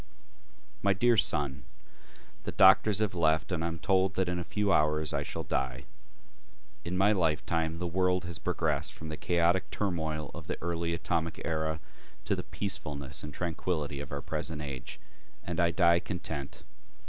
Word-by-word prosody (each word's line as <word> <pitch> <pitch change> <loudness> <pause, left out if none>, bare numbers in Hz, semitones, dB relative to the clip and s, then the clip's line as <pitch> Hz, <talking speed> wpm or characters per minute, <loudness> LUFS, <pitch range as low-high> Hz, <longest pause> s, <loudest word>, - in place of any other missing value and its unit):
MY 100 - +3
DEAR 120 +5 +4
SON: 75 -8 +1 0.8
The - - -4
doctors 95 +2 +6
have 110 -3 +1
left 80 0 +2
and 85 -2 -1
I - - +1
am 85 0 -4
told 95 +1 +2
that 95 -1 +1
in 90 0 -1
a - - -2
few 100 +3 0
hours 75 0 +2
I - - 0
shall - - -4
die. 65 0 -2 1.0
In 90 +2 -3
my 100 +2 +5
lifetime 80 -2 +1
the 90 - -3
world 90 +1 +1
has 85 -1 -4
progressed - - 0
from 80 - -8
the 80 - -3
chaotic 85 +2 +2
turmoil 80 -6 -2
of - - -9
the - - -3
early 85 0 -1
Atomic 85 0 -2
era 80 -1 -1 0.5
to - - +1
the - - -3
peacefulness 70 -9 -2
and 75 - -6
tranquility 80 -3 -2
of 70 - -7
our 70 0 -3
present 80 -2 -3
age, 70 -3 -6 0.4
and 85 -1 -3
I 85 -1 +4
die 85 -1 +4
content. 85 -6 -5
85 Hz, 170 wpm, -30 LUFS, 75-90 Hz, 1.0 s, doctors